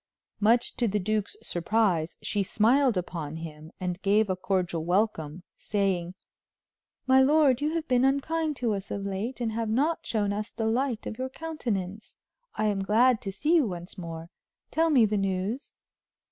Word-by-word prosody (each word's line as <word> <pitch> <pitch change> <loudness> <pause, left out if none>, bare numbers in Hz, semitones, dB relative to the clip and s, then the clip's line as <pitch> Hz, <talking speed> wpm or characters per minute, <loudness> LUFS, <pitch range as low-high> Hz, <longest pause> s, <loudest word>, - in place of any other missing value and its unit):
Much 230 +3 +3
to 240 - +2
the 210 0 0
duke's 215 - -1
surprise, 175 -2 0
she 205 - 0
smiled 235 +4 +3
upon 165 -4 -4
him 160 -1 -8
and 180 0 -3
gave 205 0 +3
a - - 0
cordial 185 -3 -1
welcome, 175 -3 0
saying: 190 -3 -1 0.9
"My 265 0 +6
lord, 285 -2 +4
you 305 +2 0
have 325 -1 -2
been 250 -1 +3
unkind 300 +3 +1
to 240 -4 0
us 195 -1 -5
of 200 -1 -4
late 200 +7 -3
and 235 -2 -1
have 225 0 -2
not 290 +9 +1
shown 205 -3 0
us 210 +2 -3
the 225 - -4
light 240 +1 0
of 215 - -6
your 260 0 -2
countenance. 220 - -4 0.4
I 215 - 0
am 205 -2 +1
glad 230 +4 +4
to 195 - -4
see 295 - 0
you 290 -7 +3
once 175 -2 -7
more; 165 -2 -7 0.4
tell 325 +1 +2
me 260 -7 +5
the 210 0 0
news." 195 +6 -2
215 Hz, 175 wpm, -27 LUFS, 185-255 Hz, 0.9 s, My